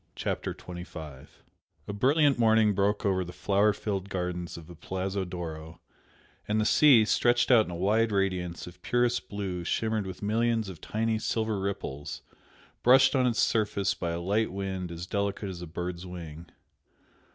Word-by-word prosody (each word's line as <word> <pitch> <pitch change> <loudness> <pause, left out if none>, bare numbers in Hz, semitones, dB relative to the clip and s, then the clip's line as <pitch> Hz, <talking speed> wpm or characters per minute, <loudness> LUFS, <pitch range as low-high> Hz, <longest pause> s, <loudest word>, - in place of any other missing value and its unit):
CHAPTER - - -3
XXV 80 -6 -9 0.6
A 100 - -4
brilliant 140 +5 +3
morning 110 -2 +4
broke 100 +2 0
over 95 -2 +2
the 90 - -8
flower 100 +3 +2
filled 100 -1 -4
gardens 90 -2 -3
of 85 - -10
the 85 - -11
Palazzo 95 +3 -3
d'Oro, 80 -3 -7 0.7
and 105 +1 +1
the 110 - +1
sea, 125 -4 +6
stretched 120 +3 +3
out 115 -4 +6
in - - -8
a - - -5
wide 110 +5 +2
radiance 90 -4 -1
of 90 +1 -13
purest 120 +2 0
blue 95 -4 -4
shimmered 110 +2 -1
with 95 - -8
millions 115 0 +1
of 85 -5 -10
tiny 110 0 -1
silver 110 -2 -1
ripples 95 -8 -4 0.6
brushed 130 +3 +6
on 130 -1 +3
its 115 -2 +2
surface 105 -3 +1
by 85 - -4
a 85 0 -2
light 100 +5 0
wind 95 -2 -4
as 85 +1 -6
delicate 100 +1 -2
as 90 -2 -7
a 85 - -6
bird's 85 +2 -5
wing. 85 -3 -8
100 Hz, 165 wpm, -28 LUFS, 90-110 Hz, 0.7 s, sea